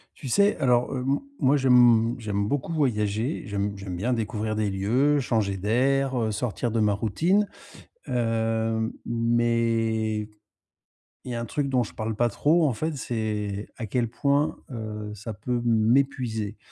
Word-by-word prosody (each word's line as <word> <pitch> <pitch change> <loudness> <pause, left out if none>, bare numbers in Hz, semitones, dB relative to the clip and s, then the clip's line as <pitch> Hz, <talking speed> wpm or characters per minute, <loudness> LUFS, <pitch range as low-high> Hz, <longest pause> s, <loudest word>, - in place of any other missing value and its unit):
Tu 135 - -8
sais, 200 - +3
alors, 125 -4 +2
heu, 130 - -2
m 140 - +2 0.2
moi, 140 +3 +4
j'aime 120 -3 +5
j'aime 100 -2 -1
beaucoup 145 +6 -2
voyager. 115 -2 0
J'aime 100 -1 -2
j'aime 95 -2 -6
bien 115 +8 0
découvrir 110 -1 -2
des 105 -1 0
lieux, 125 +10 +2
changer 110 -7 0
d'air, 130 +7 +1
heu, 110 -1 0
sortir 120 +2 -2
de 115 - 0
ma 105 -1 +3
routine. 165 - +1 0.6
Heu, 115 -1 0
mais, 115 -2 0 1.0
il 125 - -5
y - - -3
a - - -2
un 115 - -3
truc 140 +3 -2
dont 130 -2 +2
je 105 - -9
parle 110 0 -3
pas 120 +3 +2
trop 155 +8 +3
en 130 - 0
fait, 155 +7 -3
c'est 105 -4 -3
à 115 - -4
quel 115 +2 -1
point, 140 +5 +1
heu, 105 -3 -5
ça 110 +2 -7
peut 120 +4 -2
m'épuiser 115 -2 +1
115 Hz, 160 wpm, -26 LUFS, 110-130 Hz, 1.0 s, j'aime